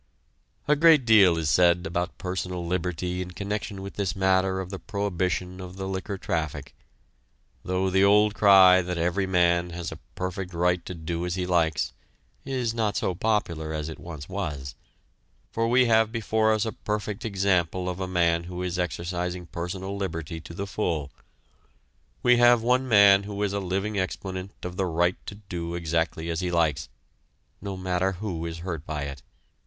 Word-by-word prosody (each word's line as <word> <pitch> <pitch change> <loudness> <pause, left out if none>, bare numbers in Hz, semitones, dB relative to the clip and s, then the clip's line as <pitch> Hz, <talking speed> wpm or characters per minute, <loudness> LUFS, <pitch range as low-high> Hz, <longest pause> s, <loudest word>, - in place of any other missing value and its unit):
A 150 - +5
great 155 -3 +6
deal 100 -7 +6
is 80 -2 -1
said 90 +3 +4
about 90 +1 -3
personal 90 -1 -4
liberty 90 +1 -2
in 90 - -5
connection 100 +1 -4
with 100 - -8
this 100 -3 -1
matter 95 0 +2
of 95 0 -5
the 95 - -5
prohibition 90 -2 -2
of 90 0 -9
the 95 0 -5
liquor 95 +1 -4
traffic, 75 -7 -3 0.9
though 95 +1 0
the 95 +1 +4
old 105 +1 +5
cry 95 -3 +7
that 90 0 -4
every 90 +3 0
man 85 -1 +2
has 85 -1 -5
a - - -8 0.2
perfect 90 0 -4
right 90 +1 +1
to 90 - -5
do 85 +1 -4
as 90 0 -2
he 90 -1 -2
likes 80 -4 +1 0.5
is 125 -4 -2
not 110 -3 0
so 95 - 0
popular 85 -6 -1
as 75 0 -3
it 80 - -8
once 80 -5 -8
was, 75 -9 -4 0.8
for 115 0 0
we 125 +2 +4
have 110 -1 +3
before 110 -1 +1
us 110 0 +1
a 110 - -2
perfect 105 +2 -4
example 95 -4 0
of 90 0 -3
a 95 - -2
man 85 -2 +1
who 90 +1 -5
is 90 0 -2
exercising 90 +1 -3
personal 90 +3 -5
liberty 85 -4 -4
to 85 - -11
the 100 - -3
full; 85 -8 -2 1.1
we 125 0 +5
have 120 -1 +5
one 125 +2 +2
man 100 -4 +7
who 100 0 -4
is 100 -1 -1
a 100 - 0
living 100 +2 -2
exponent 95 0 -4
of 90 0 -6
the 95 - +1
right 85 +2 0
to 100 - -6
do 85 -4 -6
exactly 85 -1 -1
as 85 - -2
he 90 -1 -1
likes, 80 -5 0 0.7
no 100 -1 -5
matter 95 +1 0
who 90 -4 -4
is 85 0 -6
hurt 80 -5 -4
by 75 -2 -3
it. 70 -2 -6
90 Hz, 180 wpm, -26 LUFS, 85-100 Hz, 1.1 s, cry